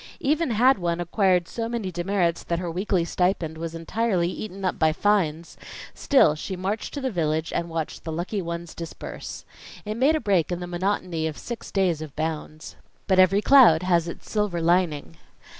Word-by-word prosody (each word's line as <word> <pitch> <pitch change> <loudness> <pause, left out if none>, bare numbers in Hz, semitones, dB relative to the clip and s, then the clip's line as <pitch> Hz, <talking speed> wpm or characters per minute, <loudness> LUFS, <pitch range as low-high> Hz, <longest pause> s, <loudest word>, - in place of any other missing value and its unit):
Even 305 +2 +1
had 245 +2 +4
one 170 -1 -1
acquired 180 0 +2
so 230 -1 -4
many 225 -6 -3
demerits 175 -1 0
that 170 - -2
her 175 -1 -3
weekly 180 0 0
stipend 170 -3 -1
was 165 0 -5
entirely 180 +1 0
eaten 195 -2 -6
up 185 - -1
by 160 -1 +4
fines, 170 -3 0 0.4
still 265 - +4
she 175 +5 -5
marched 195 +8 -3
to 285 - -4
the 260 -1 -1
village 160 -3 -1
and 170 0 -2
watched 165 -2 -4
the 160 - -5
lucky 175 +5 -3
ones 170 -1 -5
disburse. 165 -1 -8 0.4
It 210 - -2
made 280 +6 +4
a - - +1
break 190 - +1
in 175 - -2
the 180 - -5
monotony 175 -2 -2
of 155 - -6
six 240 -1 -7
days 180 -5 +1
of 155 -3 -8
bounds. 155 0 -5 0.3
But 190 -1 +2
every 195 +3 +5
cloud 230 - +7
has 175 -2 +2
its 170 - -8
silver 210 -5 -1
lining. 165 - 0
175 Hz, 185 wpm, -25 LUFS, 165-205 Hz, 0.4 s, cloud